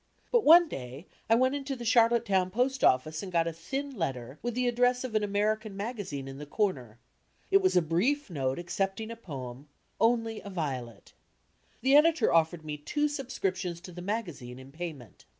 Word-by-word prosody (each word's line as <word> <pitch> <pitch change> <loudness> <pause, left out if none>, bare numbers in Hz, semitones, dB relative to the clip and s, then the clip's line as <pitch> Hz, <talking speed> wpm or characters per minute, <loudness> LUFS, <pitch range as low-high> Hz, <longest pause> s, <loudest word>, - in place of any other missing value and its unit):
But 475 -3 +4
one 340 +3 +8
day 130 - -7 0.2
I 225 - +6
went 260 +3 +3
into 275 -1 -3
the 240 -2 -7
Charlottetown 230 -5 +3
post 255 +6 0
office 155 +5 +3
and 195 -2 -7
got 170 -1 +2
a 165 - -2
thin 270 - -5
tetter 130 -3 -3
with 240 -1 -3
the 250 0 +1
address 245 +1 +2
of 255 -3 -5
an 215 -1 +1
American 210 0 -1
magazine 200 - -5
in 135 +1 -8
the 150 - -8
comer. 135 - -2 0.5
In 390 - +7
it - - 0
was 375 - +3
a 180 - +4
brief 225 - +1
note 135 -6 -2
accepting 195 +5 -3
a - - -6
poem, 140 - -8 0.3
"Only 225 -1 +1
a 200 - -9
Violet." 130 - -5 0.7
The 265 +2 +4
editor 315 +2 +5
offered 160 0 +2
me 150 -1 -4
two 295 - -1
subscriptions 195 - -3
to 185 - -10
the 175 0 -8
magazine 170 - -4
in 130 +1 -12
payment. 150 - -8
195 Hz, 185 wpm, -29 LUFS, 150-240 Hz, 0.7 s, one